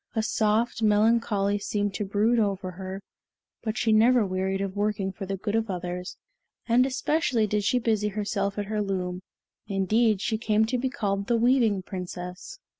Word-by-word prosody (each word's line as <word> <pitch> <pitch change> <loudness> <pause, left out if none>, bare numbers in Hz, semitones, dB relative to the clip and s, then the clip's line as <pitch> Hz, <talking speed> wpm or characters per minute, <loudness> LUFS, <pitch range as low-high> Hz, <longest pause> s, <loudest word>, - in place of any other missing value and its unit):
A 220 - +1
soft 220 +1 +1
melancholy 210 -1 +2
seemed 205 0 -1
to 210 - -2
brood 215 +4 +2
over 195 -3 -1
her, 190 +2 -7 0.6
but 220 -1 -3
she 225 - +1
never 230 +1 +5
wearied 190 0 -1
of 195 -1 -3
working 205 -2 -1
for 190 +1 -7
the 195 0 -3
good 205 +2 -3
of 225 -1 0
others, 180 0 -4 0.5
and 245 +2 +4
especially 260 -3 +1
did 210 0 -1
she 250 - +2
busy 220 -3 +1
herself 200 -1 -2
at 205 - -2
her 210 +1 -2
loom; 185 -2 -3 0.5
indeed 210 +2 +2
she 220 +2 -1
came 220 -1 +2
to 245 +3 -1
be 260 +2 -1
called 200 -5 -2
the 235 - +2
Weaving 230 -5 +3
Princess. 180 - -7
210 Hz, 175 wpm, -26 LUFS, 195-225 Hz, 0.6 s, never